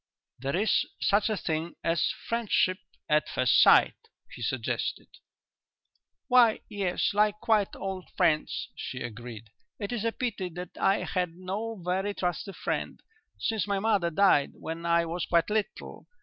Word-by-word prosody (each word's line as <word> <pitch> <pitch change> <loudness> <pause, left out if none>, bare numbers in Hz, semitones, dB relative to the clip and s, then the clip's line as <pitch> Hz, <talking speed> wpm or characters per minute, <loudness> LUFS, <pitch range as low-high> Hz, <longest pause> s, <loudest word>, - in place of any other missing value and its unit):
"There 135 +4 -2
is 210 +4 +3 0.2
such 205 +2 +2
a 215 - 0
thing 160 0 -3
as 165 -1 +1 0.2
friendship 210 -5 +1 0.3
at 150 0 +2
first - - +4
sight," - - +6 0.4
he - - -10
suggested. - - -2 1.2
"Why, 245 -4 +5
yes; 200 -3 -1
like 210 0 +2
quite 215 -3 +1
old 190 -1 -5
friends," 155 -2 +1
she 130 - -6
agreed. 115 -2 -8 0.3
"It 205 0 -5
is 235 -3 -2
a 230 - +1
pity 225 -7 -3
that 180 -1 -7
I 195 +1 +2
had 180 -3 -2
no 200 +5 -4
very 190 +3 -1
trusty 180 +2 -2
friend, - - -3 0.4
since 220 -3 -1
my 200 -1 0
mother 200 -4 +2
died 170 -5 +3
when 165 +1 -6
I 170 0 +3
was 170 +1 -3
quite 170 +4 +2
little. 215 -1 -3
190 Hz, 150 wpm, -28 LUFS, 170-210 Hz, 1.2 s, sight